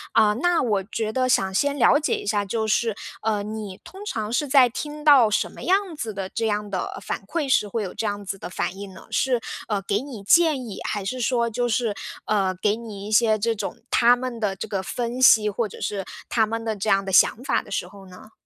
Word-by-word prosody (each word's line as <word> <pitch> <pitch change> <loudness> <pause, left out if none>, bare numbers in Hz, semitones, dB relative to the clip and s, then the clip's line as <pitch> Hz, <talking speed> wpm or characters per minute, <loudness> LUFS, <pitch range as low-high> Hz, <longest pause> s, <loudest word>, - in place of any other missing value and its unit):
呃， 210 -1 +5
那 350 0 +2
我 205 -5 0
觉 220 +1 -3
得 255 +1 +1
想 190 -5 +2
先 285 +7 +1
了 285 +3 +5
解 305 - 0
一 - - -6
下， 205 0 +1
就 220 +2 -2
是， 220 0 +1 0.3
呃， 210 -2 0
你 210 -2 -6
通 390 +2 -11
常 220 - -3
是 290 +4 0
在 265 -2 +6
听 295 +5 -6
到 275 -7 +7
什 210 - 0
么 - - -11
样 380 -2 +1
子 225 -6 -4
的 195 -1 -5
这 225 +3 -2
样 210 -1 -2
的 185 - -3
反 - - -3
馈 310 0 -2
时 255 -5 +3
会 215 +1 -2
有 185 - -6
这 220 0 -2
样 205 0 -4
子 195 0 -5
的 - - -7
反 180 +1 -3
应 200 -2 -8
呢？ - - -13
是， 255 -3 +1 0.3
呃， 205 -2 0
给 200 +1 0
你 255 -7 -9
建 305 0 +4
议 210 - -7
还 205 -2 -2
是 255 +7 -3
说 235 -1 +1
就 240 +2 -1
是， 230 -2 0 0.3
呃， 195 -3 +1
给 210 0 +2
你 210 -4 -8
一 215 - -6
些 215 0 +4
这 230 +2 0
种 - - -5
他 240 +1 +5
们 245 -2 -5
的 200 -3 -1
这 215 +4 -6
个 195 -2 -2
分 240 +5 -4
析， 215 -4 +7
或 215 +2 -1
者 - - -12
是 195 -2 -3 0.2
他 225 -2 +3
们 225 +1 -4
的 220 -1 -2
这 205 +1 -2
样 195 0 +3
的 195 - -5
想 215 +6 +4
法 - - +1
的 - - -16
时 180 - -2
候 195 0 -14
呢？ 185 +4 -14
220 Hz, 265 characters per minute, -24 LUFS, 200-245 Hz, 0.3 s, 到